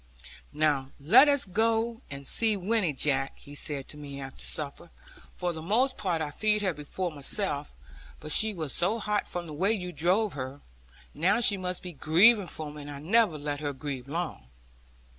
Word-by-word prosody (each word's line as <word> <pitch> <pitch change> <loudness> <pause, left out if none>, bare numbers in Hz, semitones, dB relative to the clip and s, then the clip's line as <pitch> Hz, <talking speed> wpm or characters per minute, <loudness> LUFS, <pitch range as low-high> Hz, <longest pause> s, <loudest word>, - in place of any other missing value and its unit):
'Now 145 -3 +1
let 235 - +7
us 285 -2 +3
go 225 +4 0
and 140 -1 -5
see 220 -2 +5
Winnie, 200 -2 0
Jack,' 135 -1 0
he 145 - -13
said 145 -1 -1
to 150 - -5
me 140 -2 -8
after 135 -1 -7
supper; 150 +3 -1 0.5
'for 180 -1 -2
the 160 - -7
most 235 +10 +1
part 175 -6 -1
I 150 - -4
feed 210 +5 +1
her 190 -3 +1
before 160 +5 -4
myself; 145 0 -1 0.4
but 155 - -7
she 220 +7 +2
was 160 -8 -4
so 180 +6 +1
hot 210 -2 -1
from 175 -1 -5
the 155 - -8
way 190 +8 +2
you 180 -4 -4
drove 185 +6 +1
her. 135 +1 -6 0.5
Now 185 +9 +2
she 215 -3 +4
must 180 -1 -2
be 180 - -5
grieving 185 - +4
for 155 -2 -6
me, 150 0 -9
and 145 - -9
I 145 - -7
never 185 +3 +2
let 145 -1 -4
her 145 -1 -3
grieve 135 -2 -6
long.' 165 - -4
170 Hz, 190 wpm, -28 LUFS, 145-210 Hz, 0.5 s, let